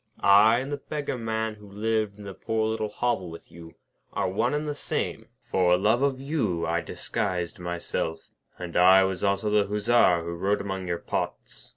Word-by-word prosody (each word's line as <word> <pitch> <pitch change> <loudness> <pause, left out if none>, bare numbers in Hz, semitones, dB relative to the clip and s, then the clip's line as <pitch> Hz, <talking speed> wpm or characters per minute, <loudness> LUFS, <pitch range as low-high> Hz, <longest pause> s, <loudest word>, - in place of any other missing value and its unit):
I 105 +3 +6
and 135 +2 -6
the 145 - -2
Beggar 145 -1 -4
Man, 110 -1 -2
who 105 -1 -15
lived 110 0 -1
in 105 - -11
the 100 -1 -7
poor 110 +2 -1
little 110 -1 -2
hovel 105 -5 -1
with 85 0 -12
you, 80 -1 -12 0.4
are - - 0
one 115 +9 0
and 150 +1 -2
the 150 - -1
same. 145 - -3 0.2
For 90 -1 +2
love 110 +6 +2
of 140 -2 +1
you 135 - -1
I 85 +1 0
disguised 90 0 -3
myself; 85 -2 -4 0.3
and 90 -1 -7
I 95 +2 +7
was 95 0 -2
also 100 +1 +1
the 105 -1 +3
Hussar 105 -4 +3
who 85 +1 -4
rode 95 +4 0
among 95 -2 -4
your 85 -1 -1
pots. - - -5
100 Hz, 190 wpm, -26 LUFS, 90-110 Hz, 0.4 s, I